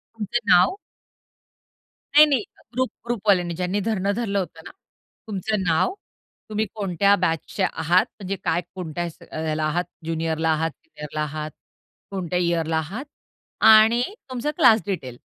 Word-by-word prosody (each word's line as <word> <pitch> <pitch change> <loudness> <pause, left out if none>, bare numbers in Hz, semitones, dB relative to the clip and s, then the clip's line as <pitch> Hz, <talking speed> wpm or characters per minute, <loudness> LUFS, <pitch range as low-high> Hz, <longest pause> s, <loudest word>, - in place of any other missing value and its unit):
तुमचं 225 +2 -1
नाव? 265 - +5 1.4
नाही, 305 +1 +10
नाही. 270 -8 +1 0.3
ग्रुप 255 0 +1 0.2
ग्रुपवाल्यांनी 195 -7 +1
ज्यांनी 180 +3 -1
धरणं 200 -2 0
धरलं 200 -4 -1
होतं 165 -3 -5
ना. - - -9 0.6
तुमचं 210 0 -1
नाव? 170 - +2 0.6
तुम्ही 215 +1 0
कोणत्या 200 0 +3
बॅचचे 165 +3 -1
आहात? 170 +2 +2
म्हणजे 195 0 -3
काय 165 +2 +1
कोणत्या 175 -2 -4 0.3
अ, - - -6
ह्याला 155 0 -1
आहात 170 +4 0 0.2
ज्युनियरला 160 0 -1
आहात, 160 +1 +1
सीनियरला 150 - -6
आहात, 150 0 -4 0.6
कोणत्या 180 -2 -2
इयरला 165 -2 +1
आहात? 195 - -4 0.6
आणि 220 +2 +7 0.3
तुमचं 255 +4 -2
क्लास 230 -8 +6
डिटेल 130 -11 -4
185 Hz, 135 wpm, -23 LUFS, 160-215 Hz, 1.4 s, नाही